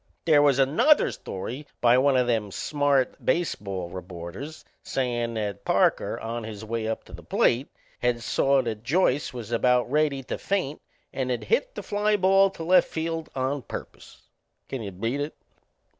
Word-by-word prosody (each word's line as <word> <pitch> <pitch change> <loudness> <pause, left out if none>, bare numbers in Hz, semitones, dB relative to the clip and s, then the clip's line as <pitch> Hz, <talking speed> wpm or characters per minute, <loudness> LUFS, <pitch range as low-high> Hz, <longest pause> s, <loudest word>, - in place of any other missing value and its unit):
They 155 -3 +6
was 145 -2 +4
another 150 - +4
story 125 +10 -6
by 120 0 +5
one 135 0 +4
o' 125 - +3
them 110 -4 0
smart 145 +4 0
baseball 100 - -1
reporters 90 - -8 0.2
sayin' 120 -3 -2
that 105 -3 -3
Parker, - - +2
on 115 +1 -4
his 110 0 -7
way 115 0 -2
up 110 - -3
to - - -16
the - - -9
plate, 125 +4 +2 0.3
had 120 -1 0
saw 135 +2 +2
that 110 -3 -4
Joyce 145 +1 +1
was 120 -3 -7
about 125 +1 +2
ready 145 -2 +1
to - - -5
faint 185 -8 -2 0.3
and 130 -1 -2
had 125 - -1
hit - - 0
the - - -5
fly 210 +1 +1
ball 195 +1 +5
to 185 -3 -8
left 180 +3 +5
field 165 0 -3
on 135 +2 -1
purpose. - - -9 0.4
Can 135 - -4
you 105 - -4
beat 115 +9 -2
it? 145 +2 -4
130 Hz, 170 wpm, -26 LUFS, 115-150 Hz, 0.4 s, They